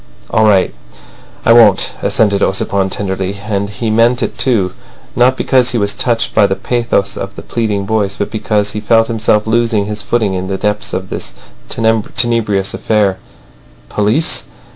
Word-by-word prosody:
"All 110 - +3
right. 100 -3 +3 0.7
I 115 - +6
won't," 110 -5 +5
assented 100 -3 +1
Ossipon 95 0 0
tenderly. 95 0 -3
And 100 -1 -3
he 110 +2 -3
meant 115 +3 +3
it - - -3
too, 100 -8 +1 0.4
not 130 +2 +3
because 130 -2 +2
he 120 - -1
was 100 -2 +1
touched 115 +2 0
by 105 - +4
the 95 - -1
pathos 115 -5 -1
of 100 +1 -6
the - - -9
pleading 105 -4 -2
voice, 100 -2 -1
but 100 - -3
because 105 -1 -1
he 105 - -4
felt 115 +1 +3
himself 110 -2 +1
losing 115 -2 +1
his 105 0 -5
footing 105 -1 0
in 95 0 -3
the 95 0 -2
depths 105 +1 -2
of 95 0 -4
this - - -5 0.3
tenebrous 110 -2 0
affair. 100 -4 0 0.7
Police! 105 +10 +1
105 Hz, 165 wpm, -14 LUFS, 100-115 Hz, 0.7 s, I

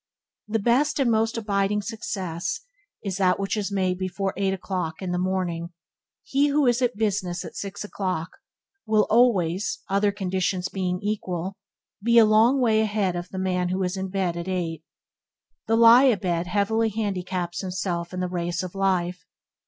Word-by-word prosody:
The 220 +1 0
best 245 +8 +2
and 255 -4 +3
most 225 +1 +1
abiding 205 -1 0
success 185 -6 -4 0.4
is 195 -3 -3
that 185 -1 +2
which 195 +2 -1
is 205 -1 -2
made 185 -2 0
before 190 +1 -2
eight 195 0 0
o'clock 180 -4 -3
in 185 -2 -4
the 180 - 0
morning. 180 -2 -2 0.5
He 280 +2 +2
who 290 0 +2
is 240 0 +3
at 245 -1 +2
his - - -19
business 185 -5 -1
at - - -9
six 200 0 -5
o'clock, 185 -5 -3 0.6
will 215 -1 +4
always 205 -6 +3
other 200 +1 +2
conditions 185 -2 -1
being 180 -2 -2
equal 190 -3 -2 0.5
be 235 +1 +4
a 230 - +9
long 225 +5 +4
way 220 -3 +3
ahead 205 -4 0
of 175 0 -5
the 190 - -7
man 180 -1 0
who 185 +1 -1
is 180 +1 -1
in 190 0 -3
bed 185 -3 -1
at 170 +1 -5
eight. 170 -4 -3 0.8
The 225 - +3
lie 235 +3 +8
a 245 -6 +4
bed 175 -3 -1
heavily 220 +4 +1
handicaps 185 -4 -3
himself 180 -2 -3
in 185 0 -4
the 180 - 0
race 175 0 -2
of 180 - -6
life. 180 -4 0
190 Hz, 175 wpm, -25 LUFS, 180-215 Hz, 0.8 s, a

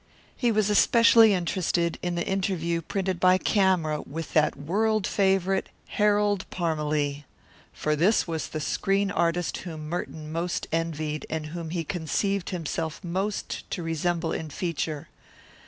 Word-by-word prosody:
He 240 -2 +1
was 215 -1 +2
especially 230 +1 +6
interested 170 -1 0
in 175 -1 -2
the 170 - -1
interview 180 -3 -1
printed 190 +1 -2
by 185 0 +5
Camera 185 -7 +2
with 165 +3 -7
that 155 -1 +3
world 210 +8 +1
favourite, 195 -1 +1 0.2
Harold 205 -2 +2
Parmalee. 150 -4 -1 0.5
For 150 0 -1
this 185 +6 +3
was 165 -2 -3
the 155 - -5
screen 195 +5 0
artist 170 -2 0
whom 160 -4 -7
Merton 155 -2 -5
most 170 +2 -2
envied, 155 -2 -2
and 160 -1 -3
whom 170 -2 -5
he 170 0 -2
conceived 180 +4 -1
himself 165 -1 -3
most 190 +4 -3
to 175 - -3
resemble 165 +1 -1
in 160 - -4
feature. 155 -1 -3
175 Hz, 140 wpm, -26 LUFS, 160-195 Hz, 0.5 s, especially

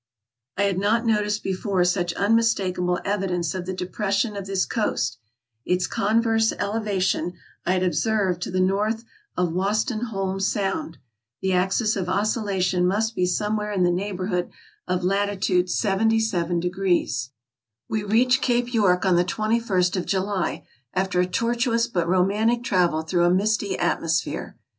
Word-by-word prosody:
I 200 - +2
had 195 -2 +1
not 220 +4 +1
noticed 210 -1 +1
before 190 -1 0
such 180 -1 +1
unmistakable 200 -5 +1
evidence 180 -5 -1
of 185 -1 -5
the 190 - -2
depression 200 +4 -1
of 200 -1 -5
this 195 -1 0
coast; 125 - -1 0.4
its 180 0 +1
converse 225 +1 +2
elevation 200 -4 -1 0.3
I 185 - +3
had 185 0 +1
observed 185 +1 0
to - - -3
the 185 - -1
north 210 +4 +1 0.3
of 180 -2 0
Wostenholme 200 0 -1
Sound. 195 -4 -1 0.5
The 190 0 +1
axis 195 +4 +1
of 185 -3 -2
oscillation 190 -3 +1
must 220 +4 0
be 180 - +1
somewhere 210 +2 -1
in 190 -3 +1
the 175 - +3
neighborhood 185 -1 -2 0.4
of 180 0 -1
latitude 190 -1 +1
77 195 -4 +1
°. 180 - 0 0.6
We 220 - -1
reached 250 +5 +3
Cape 245 0 0
York 195 -5 +3
on 185 -2 +4
the 175 - +4
twenty 215 +5 0
first 185 -5 +1
of 180 - -2
July, 195 -1 -1 0.3
after 190 -1 0
a 180 - +2
tortuous 230 +3 +1
but 175 -8 -1
romantic 205 +6 +2
travel 175 -7 +1
through 175 +2 +1
a - - +4
misty 205 +2 +1
atmosphere. 165 0 -1
195 Hz, 145 wpm, -24 LUFS, 180-215 Hz, 0.6 s, on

